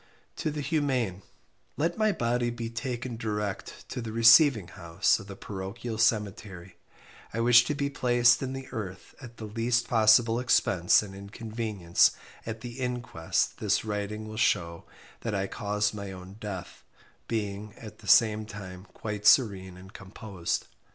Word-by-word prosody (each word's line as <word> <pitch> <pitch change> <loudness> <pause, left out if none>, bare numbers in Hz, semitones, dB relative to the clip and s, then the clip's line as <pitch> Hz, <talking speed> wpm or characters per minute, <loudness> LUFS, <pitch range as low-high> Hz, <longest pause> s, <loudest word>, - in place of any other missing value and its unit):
"to - - -2
the 150 0 -4
humane, 130 - -1 0.6
"let 165 +3 0
my 215 -1 +2
body 120 -5 0
be 115 -1 -5
taken 120 +1 -4
direct 105 -3 -4
to - - -5
the 115 -1 -5
receiving 115 - +6
house 85 -1 0
of 100 - -11
the 100 - -8
parochial 105 +4 -6
cemetery 100 -5 -1 0.6
I - - -1
wish 120 +1 +6
to 150 - -2
be 140 0 -2
placed 120 -3 +3
in 130 -1 -3
the 135 0 -7
earth 100 -6 -7
at 120 -3 -11
the 110 - -7
least 115 +2 0
possible 115 +1 +4
expense 95 -7 +3
and 100 -2 -9
inconvenience 100 -2 0 0.3
at 115 -1 -5
the 120 +2 -8
inquest 125 -10 -2
this 105 +1 0
writing 105 +1 -4
will 110 0 -8
shew 85 -6 0 0.3
that 115 -3 -3
I 95 0 0
caused 105 +1 -1
my 100 -2 -6
own 95 +1 -10
death, 100 -4 -7 0.4
being, 105 -2 -4
at 110 -2 -11
the 105 - -14
same 110 +1 +4
time 95 -3 -9
quite 105 -1 -3
serene 95 -7 +4
and 95 +1 -14
composed. 95 -2 -4
110 Hz, 155 wpm, -28 LUFS, 100-120 Hz, 0.6 s, receiving